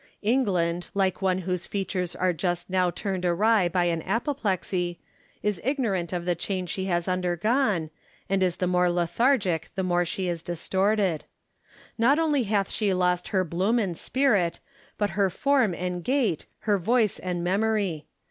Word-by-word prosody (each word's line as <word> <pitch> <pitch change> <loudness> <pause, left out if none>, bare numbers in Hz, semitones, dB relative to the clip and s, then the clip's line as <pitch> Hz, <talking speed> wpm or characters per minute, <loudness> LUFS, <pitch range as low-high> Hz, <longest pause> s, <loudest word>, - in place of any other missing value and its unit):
England, 180 -8 +1
like 190 -1 +1
one 185 -1 +2
whose 180 -1 -3
features 185 -3 -2
are 180 0 +1
just 175 +2 -2
now 185 -1 +3
turned 185 +1 -3
awry 190 +2 +3
by 175 0 +1
an 165 -2 0
apoplexy, 190 - -1 0.5
is 205 -4 -1
ignorant 220 - -1
of 175 -1 -3
the 180 - +2
change 180 +1 -3
she 190 - -3
has 175 -2 0
undergone, 185 - +1 0.4
and 195 0 +1
is 180 -2 +2
the 185 - -1
more 180 0 +2
lethargic 175 - +1
the 190 - -1
more 175 -1 +2
she 185 +2 -3
is 170 -2 -2
distorted, 190 +1 0 0.7
Not 260 +6 +4
only 300 -6 +2
hath 200 -1 0
she 200 -4 0
lost 180 -1 +1
her 190 -2 +1
bloom 185 +7 0
and 195 -7 0
spirit, 210 -8 +1 0.4
but 205 -2 0
her 195 +1 +2
form 255 -2 +2
and 180 0 -3
gait, 245 - 0
her 205 -2 +1
voice 225 +2 +2
and 180 -2 -3
memory. 195 -3 0
185 Hz, 160 wpm, -26 LUFS, 175-210 Hz, 0.7 s, Not